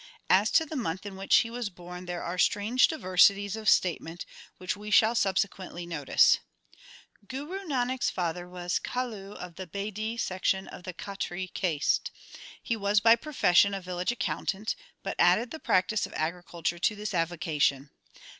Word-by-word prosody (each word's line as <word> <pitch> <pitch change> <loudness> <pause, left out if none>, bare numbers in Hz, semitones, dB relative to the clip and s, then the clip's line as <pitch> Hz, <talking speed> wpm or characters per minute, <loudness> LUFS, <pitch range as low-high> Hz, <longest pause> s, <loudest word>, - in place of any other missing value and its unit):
As 205 +3 +5
to 320 - +5
the 315 - -7
month 190 - -3
in 200 -1 -6
which 195 +1 +2
he 230 - +3
was 240 -3 -3
born 180 0 -10
there 175 -1 -4
are 180 +1 -4
strange 220 +7 +3
diversities 200 - +3
of 220 -1 0
statement, 170 -1 +1 0.3
which 185 +2 -3
we 210 +1 -8
shall 220 +2 +5
subse 195 -4 +2
quently 180 -2 -9
notice. 150 -5 +4 0.9
Guru 290 +9 -5
Nanak 255 -3 -1
s - - +2
father 175 0 -3
was 180 0 -2
Kalu 220 -6 -4
of 175 -2 -9
the 185 - -6
Bedi 210 +4 -4
l - - -9
section 190 -2 -1
of 180 - -11
the 185 - -5
Khatri 185 -2 -5
caste. 160 -6 0 0.5
He 230 - -1
was 205 -1 +2
by 225 +2 +6
profession 200 -7 +3
a - - -3
village 180 +2 -2
accountant, 200 +1 -2 0.3
but - - -4
added 240 - +4
the 320 - -6
practice 195 -1 +1
of - - -15
agriculture 170 +1 -3
to 210 - +1
this 210 0 -5
avocation. 160 -5 0
195 Hz, 170 wpm, -28 LUFS, 175-220 Hz, 0.9 s, by